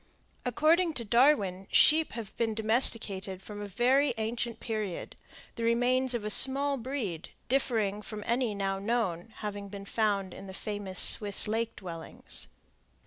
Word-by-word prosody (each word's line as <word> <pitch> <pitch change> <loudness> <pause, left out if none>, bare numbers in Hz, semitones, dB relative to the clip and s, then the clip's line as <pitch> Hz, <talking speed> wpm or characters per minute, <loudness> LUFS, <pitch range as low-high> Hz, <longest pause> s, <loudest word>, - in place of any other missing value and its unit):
According 320 +7 +2
to 235 -5 -4
Darwin, 210 -6 +2
sheep 315 +1 +4
have 225 -3 -8
been 225 -2 -1
domesticated 215 -4 0
from 205 -1 -8
a 205 - -6
very 250 +6 +1
ancient 230 +1 -4
period, 215 -6 -5 0.4
the 230 - -4
remains 245 +2 +1
of 220 -3 -4
a 210 - 0
small 275 +5 +5
breed, 230 - -5 0.2
differing 220 -6 0
from 210 0 -8
any 235 -2 -1
now 195 -1 -2
known, 205 -3 -2
having 205 -1 -6
been 200 0 -9
found 200 -3 -1
in 195 - -11
the 190 - -9
famous 205 -3 -5
Swiss 205 -1 +6
lake 225 +2 -2
dwellings. 170 -4 -5
220 Hz, 145 wpm, -29 LUFS, 200-245 Hz, 0.4 s, Swiss